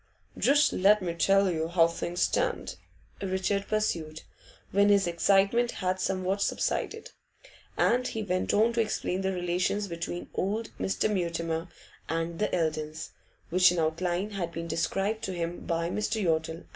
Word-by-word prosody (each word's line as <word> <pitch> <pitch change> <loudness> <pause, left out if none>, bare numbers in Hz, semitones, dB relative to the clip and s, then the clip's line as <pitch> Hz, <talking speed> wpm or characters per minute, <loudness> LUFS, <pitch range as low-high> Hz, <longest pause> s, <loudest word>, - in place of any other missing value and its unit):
'Just 290 +2 +3
let 205 +3 +5
me 170 -2 -2
tell 195 +2 +3
you 160 -1 -1
how 165 -1 +4
things 170 +1 -4
stand,' - - 0 0.5
Richard 195 +1 -1
pursued, 165 -8 -2 0.5
when 200 +1 +4
his 200 -1 +4
excitement 195 +7 +2
had 185 0 -1
somewhat 190 +1 -1
subsided; 440 - -1 0.7
and 250 +1 +2
he 220 - -3
went 185 -2 -1
on 225 +3 +3
to 230 - +2
explain 190 -3 -2
the 190 0 0
relations 180 +3 -1
between 170 0 -5
old 215 +4 -2
Mr. 195 - 0
Mutimer 170 -4 -2 0.4
and 165 +1 -2
the 210 - 0
Eldons, 155 -2 -2 0.4
which 185 +1 +6
in 180 - -2
outline 175 +5 -1
had 180 -4 -3
been 165 0 -5
described 195 +6 -1
to 190 - -4
him 170 0 -3
by 170 0 0
Mr. 210 +4 -1
Yottle. 165 -2 -1
185 Hz, 150 wpm, -28 LUFS, 170-200 Hz, 0.7 s, which